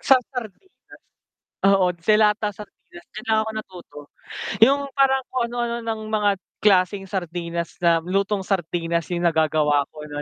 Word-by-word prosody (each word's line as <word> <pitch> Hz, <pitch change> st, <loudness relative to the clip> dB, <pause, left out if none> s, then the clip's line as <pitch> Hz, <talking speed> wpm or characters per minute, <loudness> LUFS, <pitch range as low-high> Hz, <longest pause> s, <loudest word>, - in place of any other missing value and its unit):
sa 270 Hz, -, +5 dB, 0.2 s
sardinas. 250 Hz, -, -7 dB, 1.0 s
Oo, 195 Hz, -2 st, +4 dB
de-lata 210 Hz, +3 st, +2 dB
sardinas 200 Hz, -4 st, -13 dB, 0.2 s
diyan 215 Hz, -, -7 dB
lang 220 Hz, -1 st, +3 dB
ako 220 Hz, -, -5 dB
natuto 185 Hz, -8 st, -9 dB, 0.6 s
yung 280 Hz, +5 st, +5 dB
parang 265 Hz, -1 st, +3 dB
kung 255 Hz, -, -1 dB
ano-ano 235 Hz, 0 st, -2 dB
ng 225 Hz, -1 st, -4 dB
mga 210 Hz, -1 st, +2 dB, 0.3 s
klaseng 195 Hz, -1 st, +3 dB
sardinas 170 Hz, -2 st, -4 dB
na, 170 Hz, -2 st, +3 dB
lutong 195 Hz, +2 st, -1 dB
sardinas 170 Hz, -3 st, -1 dB
yung 175 Hz, -1 st, -2 dB
nagagawa 155 Hz, -3 st, +2 dB
ko 150 Hz, -1 st, -11 dB
no'n 145 Hz, -1 st, -6 dB
195 Hz, 140 wpm, -23 LUFS, 170-220 Hz, 1.0 s, sa